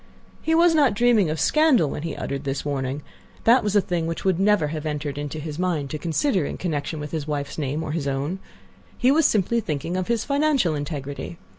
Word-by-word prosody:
He 320 - +1
was 340 0 +5
not 280 -9 +3
dreaming 225 -6 +3
of 155 0 -2
scandal 305 - +4
when - - -4
he 165 0 -4
uttered 140 0 -4
this 135 0 -3
warning; 140 0 -2 0.4
that 240 +3 +5
was 210 -1 -1
a 205 - +6
thing 175 -3 -2
which 165 +3 -4
would 185 -2 +2
never 195 -6 +3
have 155 0 -4
entered 150 -1 -3
into 145 +1 -5
his 155 0 -6
mind 165 -7 -1
to 155 - -4
consider 180 - +1
in - - -4
connection 155 -2 -3
with 150 -1 -6
his 155 -2 -3
wife's 145 0 -3
name 145 +2 -2
or 150 - -4
his 150 -3 -2
own. 140 +7 -2 0.6
He 255 +1 +4
was 310 +1 +5
simply 220 +3 +1
thinking 165 -3 -3
of 185 -1 -2
his 235 -2 0
financial 280 - +2
integrity. 145 +1 -5
165 Hz, 220 wpm, -24 LUFS, 145-210 Hz, 0.6 s, a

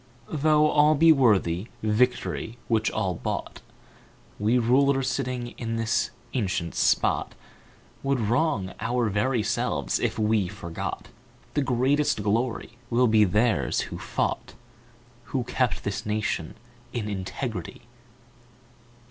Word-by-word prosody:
Though 150 0 +3
all 150 +1 +4
be 165 +2 +6
worthy 105 - +3 0.2
Victory 115 +1 0
which 110 -1 +2
all 95 -2 -1
bought, 80 - -4 0.8
We 110 +4 +2
rulers 135 +3 +3
sitting 125 -2 -2
in 115 -1 -3
this 115 0 0 0.2
ancient 95 -8 -1
spot - - +1 0.7
Would 135 -1 0
wrong 115 - 0
our 120 -1 0
very 115 +3 +1
selves - - -1
if - - -1
we 110 -3 +2
forgot 85 -1 -6 0.4
The 145 - +1
greatest 135 -2 +1
glory 115 +3 -1
will 125 +1 +3
be 110 -2 +5
theirs 105 - +1
who - - -6
fought, - - -2 0.7
Who 130 -3 -2
kept 125 -1 -1
this 100 -1 -3
nation 105 -6 -2 0.4
in 115 -4 -3
integrity." 100 +1 -5
115 Hz, 115 wpm, -26 LUFS, 105-130 Hz, 0.8 s, be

